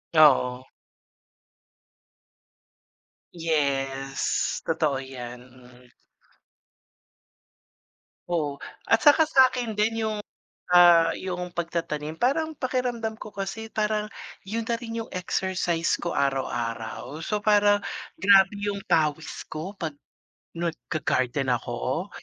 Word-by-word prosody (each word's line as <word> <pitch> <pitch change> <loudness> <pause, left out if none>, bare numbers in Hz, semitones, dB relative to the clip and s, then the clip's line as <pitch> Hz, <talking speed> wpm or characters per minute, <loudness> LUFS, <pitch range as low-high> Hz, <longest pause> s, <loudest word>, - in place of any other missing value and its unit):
Oo. 130 -4 +5 2.7
Yes, 135 -4 -1
totoo 155 -4 0
‘yan. 125 -2 -8
Mm. 125 0 -18 2.4
Oo. 150 -5 -1 0.2
At 225 - +3
saka 300 +2 +6
sa’kin 255 -6 +3
din, 220 +2 0
yung, 215 -1 -2 0.5
ah, 170 -2 +7
yung 180 -1 -4
pagtatanim 165 -3 -3
parang 315 +5 +1
pakiramdam 245 -5 -2
ko 215 - -9
kasi 200 +3 -5
parang 210 0 0 0.4
yun 230 +3 -2
na 235 - 0
rin 230 -1 -5
yung - - -15
exercise 180 -2 0
ko 170 - -3
araw-araw. 130 +1 -2
So, 210 -1 -1
parang 205 -1 +4 0.4
grabe 195 0 +6
yung 200 -1 -2
pawis 155 0 0
ko 160 +6 -5
‘pag 155 -5 -5 0.6
nag 170 -1 -2
ga-garden 130 -3 0
ako. 125 - -3
170 Hz, 95 wpm, -26 LUFS, 140-210 Hz, 2.7 s, ah